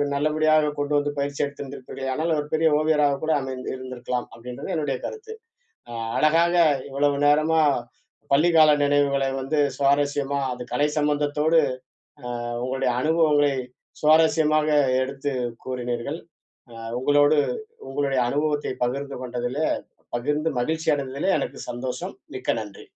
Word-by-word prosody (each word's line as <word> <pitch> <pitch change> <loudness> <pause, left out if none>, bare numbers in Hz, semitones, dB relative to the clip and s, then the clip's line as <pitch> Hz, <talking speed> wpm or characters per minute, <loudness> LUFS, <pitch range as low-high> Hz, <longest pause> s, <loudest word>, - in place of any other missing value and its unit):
நல்லபடியாக 155 +1 +2
கொண்டு 145 0 -1
வந்து 145 0 0
பயிற்சி 140 0 -3
எடுத்து 140 -1 -8
இருப்பீர்களேயானால், 135 +5 -3
ஒரு 145 - -3
பெரிய 160 +1 +3
ஓவியராக 150 -2 +2
கூட 160 - 0
அமைந் 130 -1 -6
இருந்திருக்கலாம், 125 -1 -5
அப்டீன்றது 125 +10 -7
என்னுடைய 145 -4 -1
கருத்து. 445 0 -7 0.6
அ - - -9 0.3
அழகாக 165 +3 +3 0.3
இவ்வளவு 140 +1 +1
நேரமா, 155 +2 +4 0.7
பள்ளி 150 +5 +5
கால 155 -2 +7
நினைவுகளை 140 -1 +2
வந்து 140 +4 -1 0.2
சுவாரஸ்யமா 140 0 +1
அது 125 0 -6
கலை 145 - +2
சம்பந்தத்தோடு, 150 +2 +2 0.7
அ - - -9 0.4
உங்களுடைய 130 0 0
அனுபவங்களை 150 -2 +3 0.5
சுவாரஸ்யமாக 155 0 +4 0.3
எடுத்து 135 +2 -3 0.3
கூறினீர்ங்கள். 125 +3 -3 0.5
அ - - -12 0.2
உங்களோடு 145 +2 +4 0.5
உங்களுடைய 135 -1 0
அனுபவத்தை 145 0 -1
பகிர்ந்து 140 +3 -4
கொண்டதிலே, 125 +5 -2 0.5
பகிர்ந்து 150 +6 -1
மகிழ்ச்சி 160 +5 -1
அடைந்ததிலே 140 +6 -2
எனக்கு - - -5
சந்தோஷம். 125 +1 -5 0.2
மிக்க - - -1
நன்றி. 105 -2 -10
145 Hz, 120 wpm, -24 LUFS, 135-155 Hz, 0.7 s, கால